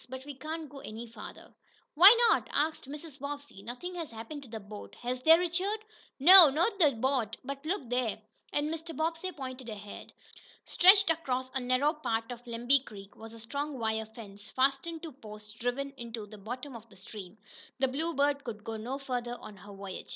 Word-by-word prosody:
But 260 +1 -7
we 290 - -7
can't 310 +4 -6
go 275 0 -11
any 225 -1 -7
farther." 225 -2 -11 0.4
"Why 365 +6 +10 0.2
not?" - - +1
asked 305 -2 -1
Mrs. 295 -1 -9
Bobbsey. 285 -6 -7
"Nothing 245 - -7
has 335 -4 -5
happened 230 +6 -8
to 265 - -13
the 220 0 -6
boat, 205 0 -10
has 250 +1 -4
there, 320 +4 +8
Richard?" 360 +4 -1 0.4
"No, 350 +2 +11
not 345 +9 0
to 310 -5 +6
the 275 - -6
boat. 235 -2 0
But 275 +1 -6
look 365 -7 -2
there!" 245 -2 -1 0.3
and 295 +2 0
Mr. 325 0 -7
Bobbsey 330 +3 -1
pointed 260 -5 -7
ahead. 205 -1 -9 0.5
Stretched 390 0 +6
across 260 -5 -2
a 265 - 0
narrow 255 +4 +2
part 225 -7 -2
of 245 0 -9
Lemby 240 +4 +3
Creek 200 -6 -12
was 225 0 -11
a - - -11
strong 280 +5 -4
wire 220 -1 -1
fence, 205 -2 -11
fastened 275 +5 0
to 325 - -6
posts 215 -5 -11
driven 245 +5 -3
into 230 -2 -6
the 210 0 -12
bottom 250 +6 -7
of 230 0 -11
the 200 - -17
stream. 190 0 -10 0.4
The 265 0 +2
Bluebird 285 0 0
could 215 -3 -7
go 225 0 -5
no 245 +5 -4
farther 245 -3 -4
on 210 - -10
her 205 +2 -12
voyage. 195 -1 -8
260 Hz, 195 wpm, -30 LUFS, 225-300 Hz, 0.5 s, No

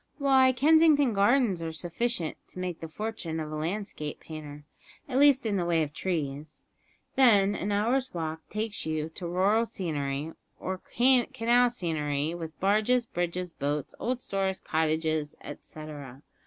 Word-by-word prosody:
Why, 265 -2 +5
Kensington 290 0 +5
Gardens 205 -2 +3
are 165 -1 -3
sufficient 175 +3 -2
to - - -14
make 180 -2 -4
the 165 - -6
fortune 175 -3 -4
of 155 -1 -5
a - - -4
landscape 160 -1 -4
painter 150 -2 -9 0.4
at 265 -1 0
least 280 -3 +5
in 205 -3 +1
the 180 - 0
way 170 -2 +2
of 150 -1 -6
trees; 150 -4 -4 0.5
then 205 -7 +5
an 205 +1 -2
hour's 245 +6 +1
walk 160 -2 -4
takes 215 0 -3
you 155 0 -2
to 170 +2 -7
rural 200 +6 +2
scenery, 150 -5 -3 0.3
or 185 0 -4 0.2
canal 245 -1 +4
scenery, 155 -7 -1
with 165 -2 -7
barges, 215 +5 +2
bridges, 175 -3 -3
boats, 145 0 -2
old 250 +1 -2
stores, 195 -1 -1
cottages, 155 -1 0
etcetera. 145 -3 -9
180 Hz, 145 wpm, -28 LUFS, 155-235 Hz, 0.5 s, Why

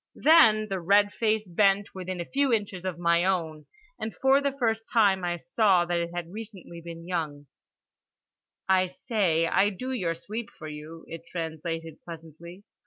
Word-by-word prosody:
Then 225 -10 +6
the 195 -2 -3
red 205 +4 +3
face 215 -2 0
bent 195 +2 +2
within 185 -1 -5
a 170 - -3
few 275 +4 +1
inches 205 -5 -1
of 185 -3 -3
my 170 0 +2
own, 165 -5 -1 0.3
and 220 - -5
for 270 +1 +3
the 280 0 0
first 225 -3 -1
time 200 -5 +3
I 175 0 -1
saw 180 +1 +2
that 175 0 0
it 170 0 -2
had 175 -1 -5
recently 205 -6 -9
been 165 0 -9
young—"I 170 +3 -5
say 180 -4 0
I 195 +4 +3
do 255 +7 -6
your 180 -10 -1
sweep 210 +7 -6
for 155 -4 -11
you" 155 +2 -9
it 165 0 -9
translated 165 -1 -5
pleasantly. 170 +3 -11
180 Hz, 165 wpm, -27 LUFS, 165-215 Hz, 0.3 s, Then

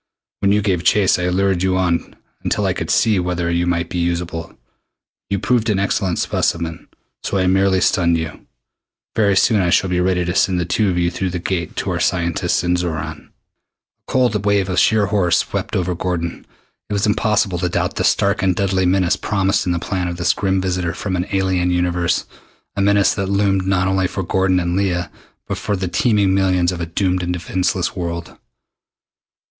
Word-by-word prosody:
When 100 - +2
you 105 0 +2
gave 90 -4 0
chase 95 0 +3
I 90 - 0
lured 95 0 +1
you 95 0 +1
on 90 -2 -1 0.3
until - - 0
I - - +1
could - - -5
see 110 -4 +3
whether 90 -1 -1
you 85 +1 0
might 85 -1 0
be 90 - -4
usable. 85 -1 -3 0.7
You 100 - 0
proved 115 +3 +1
an 105 - +2
excellent 95 -2 0
specimen, 85 -1 -1 0.3
so 100 - -2
I 95 - +1
merely 95 0 +3
stunned 85 -5 +2
you. 80 -1 -6 0.7
Very 100 -3 +3
soon 110 0 +4
now 90 - +1
I - - +1
shall 95 +2 +2
be 90 - +1
ready 90 -1 +1
to 90 - -1
send 95 -1 +2
the 85 - -1
two 100 +3 +1
of 90 - -1
you 85 0 +1
through 95 +2 -2
the 90 - -3
Gate 85 -1 -3
to - - -2
our - - -2
scientists 85 -2 0
in 90 0 +1
Xoran." 85 -2 -4
A - - -34 0.8
cold 120 -6 +1
wave 100 -2 +1
of 90 - +1
sheer 110 -2 +3
horror 100 -3 +1
swept - - 0
over 90 0 0
Gordon. 85 -1 -4 0.4
It - - -3
was 100 -1 +1
impossible 105 -4 +1
to 90 0 0
doubt - - -2
the - - 0
stark 100 +1 +2
and 95 -2 +2
deadly 95 -2 +1
menace 90 -1 +2
promised 95 -2 0
in - - +1
the 85 - 0
plan 90 +1 -2
of 85 0 -4
this 85 - +2
grim 95 -1 0
visitor 90 -2 -2
from 95 -3 -3
an 90 +1 -2
alien 95 -2 +1
universe 90 -1 0 0.5
a 100 - -1
menace 100 -1 +3
that 100 -1 -2
loomed 100 -1 +1
not 95 -1 +1
only 95 -1 +1
for 95 - -4
Gordon 95 +1 +1
and 85 0 -1
Leah 90 -4 -1 0.3
but - - -4
for 105 - -1
the 95 -1 -3
teeming 100 +1 +2
millions 95 -2 +2
of 90 -1 -5
a 85 - -3
doomed 90 +2 0
and 90 0 -2
defenseless 90 +1 -1
world. 85 -2 -5
90 Hz, 205 wpm, -19 LUFS, 90-100 Hz, 0.8 s, soon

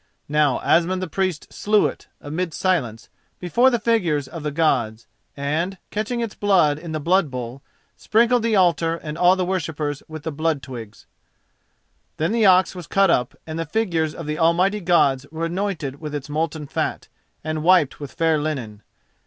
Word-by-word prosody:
Now 150 -3 +2
Asmund 180 +2 +2
the 185 - -3
Priest 185 -1 -2
slew 210 0 +2
it, - - -4
amid 160 +3 -4
silence, 130 - -1 0.3
before 235 +9 +3
the 240 - +1
figures 175 - +1
of 165 - -8
the 150 - -2
Gods, 125 -8 0 0.3
and, 160 +7 -2
catching 220 +3 -2
its 230 -3 -3
blood 175 -8 +2
in 165 0 -8
the 155 - -2
blood 170 +1 +2
bowl, 125 0 -6 0.4
sprinkled 235 +2 +3
the 225 -1 +1
altar 170 -3 +3
and 155 -2 -7
all 180 +2 +5
the 185 -1 -1
worshippers 155 -5 -2
with 155 -2 -8
the 160 - -3
blood 155 -1 -1
twigs. 115 -5 -9 1.1
Then 160 +5 0
the 225 -2 +3
ox 185 0 +5
was 180 -4 -9
cut 195 -2 +3
up, 125 -6 0
and 160 0 -5
the - - 0
figures 165 -5 -1
of 165 - -7
the 150 0 -3
almighty 180 +5 +2
Gods 140 -6 +2
were 160 +1 -3
anointed 165 -6 -3
with 150 -1 -5
its 145 0 -6
molten 155 0 -2
fat - - -3 0.4
and 155 0 -3
wiped 170 -4 +3
with 145 -2 -7
fair 165 -2 +2
linen. 130 -9 -4
165 Hz, 180 wpm, -22 LUFS, 145-185 Hz, 1.1 s, all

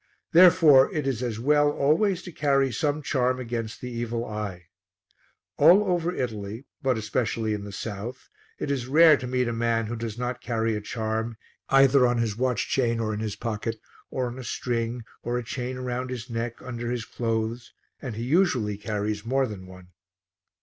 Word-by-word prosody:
Therefore, 165 -6 +7
it 150 -3 -2
is 130 -4 -1
as 115 -3 -3
well 145 +3 +4
always 165 +7 +2
to 180 - -8
carry 140 -3 +2
some 150 +4 -1
charm 130 -2 +1
against 115 -1 -4
the 125 - -5
evil 120 0 -3
eye. 105 -5 -5 0.9
All 195 +4 +7
over 175 -3 0
Italy, 110 - -4 0.2
but 130 -3 +1
especially 110 0 -1
in 105 -1 -4
the 100 - -7
south, 110 +4 -6 0.3
it 140 - -3
is 130 -3 -2
rare 155 +3 +7
to 125 - -6
meet 125 0 0
a 120 - -1
man 115 -1 0
who 115 +2 -4
does 115 -1 -5
not 125 0 -3
carry 115 -1 -1
a 105 - -3
charm, 110 +1 -3 0.3
either 135 -1 +6
on 120 0 +1
his 115 -3 0
watch 125 -2 0
chain 115 -3 +1
or 110 -1 -1
in 105 - -3
his 110 -2 -3
pocket, 115 0 -3 0.3
or 130 - -2
on 125 +1 -5
a - - -6
string 120 -1 -2 0.2
or 120 +1 -2
a 125 - -3
chain 125 +2 -4
round 125 0 -3
his 125 -1 -6
neck 115 0 -4
under 120 -2 -5
his 120 -2 -3
clothes, 115 +1 -3 0.3
and 125 -5 -5
he 115 - -4
usually 130 - +2
carries 105 0 -2
more 135 +3 +1
than 100 -6 -8
one. 90 -1 -13
120 Hz, 185 wpm, -26 LUFS, 110-130 Hz, 0.9 s, Therefore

